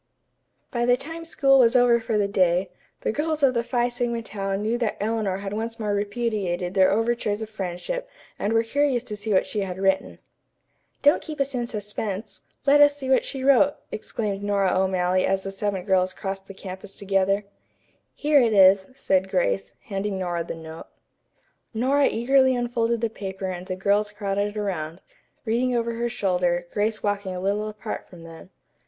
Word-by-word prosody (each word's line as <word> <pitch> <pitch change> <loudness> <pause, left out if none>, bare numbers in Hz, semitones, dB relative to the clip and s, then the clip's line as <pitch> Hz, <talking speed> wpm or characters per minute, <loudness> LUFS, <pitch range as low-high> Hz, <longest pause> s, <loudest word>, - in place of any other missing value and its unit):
By 240 -1 0
the 245 0 +5
time 325 +5 -8
school 275 -4 +3
was 235 -1 +5
over 245 -1 +5
for 225 -1 -1
the 205 -1 +2
day, 185 -2 +2 0.3
the - - 0
girls 305 +3 -1
of 265 -2 +5
the 235 - +1
Phi 240 0 +1
Sigma 240 -1 -2
Tau 195 -3 -3
knew 215 +4 -1
that 230 -3 -1
Eleanor 210 -3 -1
had 195 0 -5
once 225 +2 -4
more 210 -2 -1
repudiated 205 -4 -2
their 190 -1 +5
overtures 225 0 0
of 220 - -9
friendship 215 - -4 0.3
and 205 - -1
were 225 0 +3
curious 265 +1 +1
to 215 -4 -6
see 210 +1 -4
what 190 - +3
she 210 - -3
had 190 -2 -3
written. 190 0 0 0.9
"Don't 290 +2 +5
keep 310 -3 -7
us 275 0 0
in 240 -2 -2
suspense. 210 -2 -5 0.2
Let 290 +1 +6
us 290 0 +6
see 265 -2 -3
what 260 - +4
she 265 -1 -4
wrote," 280 +1 +5 0.2
exclaimed 210 -2 -3
Nora 200 -2 +1
O'Malley 185 -1 +2
as 190 0 0
the 195 - -4
seven 195 -1 -2
girls 185 -1 +2
crossed 195 -1 -5
the 195 - -10
campus 190 +1 -9
together. 195 0 +1 0.7
"Here 295 -1 +4
it 230 -3 +2
is," 190 -1 +6
said 190 -6 +1
Grace, 100 - 0
handing 195 0 -3
Nora 175 -2 -2
the 165 - -6
note. 160 0 -10 0.9
Nora 270 +5 +3
eagerly 260 +2 +3
unfolded 235 -1 0
the 230 - +1
paper 195 -3 -6
and 180 0 -7
the 185 - -3
girls 205 +2 +1
crowded 205 0 -2
around, 175 -5 -3 0.5
reading 245 +3 +1
over 235 0 0
her 235 +1 -2
shoulder, 180 -4 0
Grace 215 +1 -1
walking 200 -2 -1
a - - -4
little 200 +3 -1
apart 215 +1 -6
from 175 -2 -13
them. 165 +2 -12
210 Hz, 185 wpm, -24 LUFS, 190-240 Hz, 0.9 s, Let